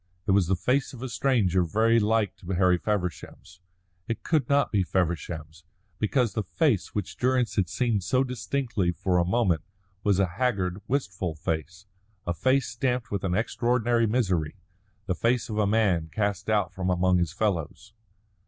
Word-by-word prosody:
It 105 - +1
was 95 -3 +3
the 95 - +2
face 125 +11 0
of 125 -1 -9
a 130 - -4
stranger 110 -7 +2
very 110 +6 +3
like 110 -1 +1
to 85 - -15
Harry 90 -1 +3
Feversham's. 90 -3 -4 0.5
It 115 - -4
could 150 -7 +1
not 140 0 +3
be 100 - +2
Feversham's, 80 -3 -2 0.4
because 115 +1 +1
the 110 - -1
face 125 - 0
which 100 -3 -4
Durrance 125 -2 +1
had 95 -4 +1
seen 115 -3 0
so 130 +8 +1
distinctly 125 -6 -1
for 90 +1 0
a - - +3
moment 95 -5 +1 0.4
was 100 -3 +3
a 100 - +3
haggard, 95 -2 -1
wistful 95 - -2
face 80 +4 -4 0.4
a 85 - -1
face 130 +8 +2
stamped 125 +1 -2
with 100 -2 -2
an 90 -2 0
extraordinary 120 +1 +1
misery; 95 -10 0 0.5
the 90 - 0
face 115 +7 0
of 110 -1 -2
a 105 - +3
man 100 -7 +2
cast 100 +2 -2
out 105 -2 +1
from 95 -1 -2
among 90 0 +3
his 85 -3 0
fellows. 100 +1 -2
100 Hz, 170 wpm, -26 LUFS, 90-120 Hz, 0.5 s, was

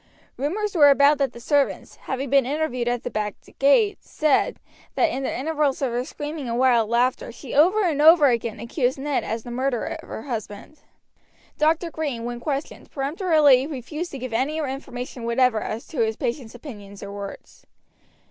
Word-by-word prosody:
Rumors 400 +10 -2
were 295 -5 +7
about 285 +1 +5
that 275 -1 +1
the 235 - -11
servants, 285 +3 0
having 265 0 -4
been 275 -1 +5
interviewed 255 -3 -2
at 240 -1 -1
the - - -4
back 210 -1 -2 0.2
gate, 400 - +4
said, 305 -3 +1 0.4
that - - +2
in 270 - -3
the 270 - -2
intervals 300 +1 0
of 260 - 0
her 240 +1 -1
screaming 295 -1 -6
and 235 - -1
wild 240 -4 +3
laughter 240 +1 +1
she 245 +2 -9
over 370 +9 +4
and 310 -5 +1
over 320 0 +7
again 235 -4 0
accused 245 +3 -1
Ned 280 0 -1
as 225 0 -4
the 240 - -8
murderer 255 -1 -2
of - - -16
her 220 - -6
husband. 225 +2 -6 0.8
Dr. 325 +2 +2
Green, 285 -8 -3
when 240 0 -4
questioned, 280 +3 -4
peremptorily 290 -2 +3
refused 305 +4 -5
to 275 - -7
give 255 -2 -6
any 270 +7 0
information 260 -4 -5
whatever 235 -1 +2
as 220 +2 -5
to 310 - -6
his 220 0 -1
patient's 240 -1 -4
opinions 205 -7 -10
or 200 - -7
words. 200 -1 -9
270 Hz, 180 wpm, -23 LUFS, 240-300 Hz, 0.8 s, were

